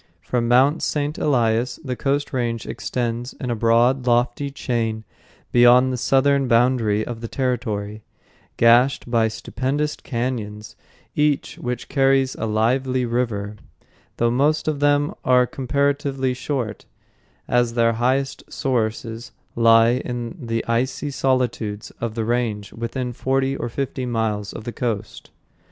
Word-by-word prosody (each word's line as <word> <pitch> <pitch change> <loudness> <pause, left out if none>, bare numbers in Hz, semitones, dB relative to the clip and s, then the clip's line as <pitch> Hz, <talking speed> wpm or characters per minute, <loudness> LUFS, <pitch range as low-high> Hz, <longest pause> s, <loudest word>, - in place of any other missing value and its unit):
From 120 -2 -1
Mt. 130 +6 +4
St. 150 0 -1
Elias 120 -3 +1
the 130 -3 -3
coast 140 +3 -1
range 120 -3 -2
extends 120 0 -3
in 125 - -5
a - - 0
broad, 120 +3 +2
lofty 120 +3 +1
chain 115 -5 -2 0.5
beyond 125 +1 +6
the - - 0
southern 135 +2 +2
boundary 115 -3 +2
of 115 -2 -6
the 115 - -4
territory, 110 -5 -2 0.6
gashed 120 +2 +4
by 115 -2 +3
stupendous 135 +6 -2
cañons, 115 -4 -4 0.4
each 150 -1 0
of - - -10
which 125 0 -3
carries 135 -1 +2
a 115 - -4
lively 125 +4 +1
river, 110 -4 -2 0.6
though 120 0 +2
most 145 +6 +1
of 150 -2 0
them 145 +3 +2
are 125 -1 +4
comparatively 140 0 -1
short, 125 -3 -4 0.6
as 120 -1 +1
their 115 -1 +3
highest 130 +4 0
sources 115 -2 -2 0.2
lie 115 +1 +5
in 120 +4 -5
the 115 0 -1
icy 130 +5 -1
solitudes 125 -6 -1
of 115 -2 -3
the 115 -1 -1
range 110 -4 -1
within 120 +2 -4
forty 135 +2 0
or 120 - -4
fifty 130 0 -3
miles 110 -3 -1
of - - -8
the 120 +1 -6
coast. 110 -4 -4
125 Hz, 135 wpm, -22 LUFS, 115-135 Hz, 0.6 s, beyond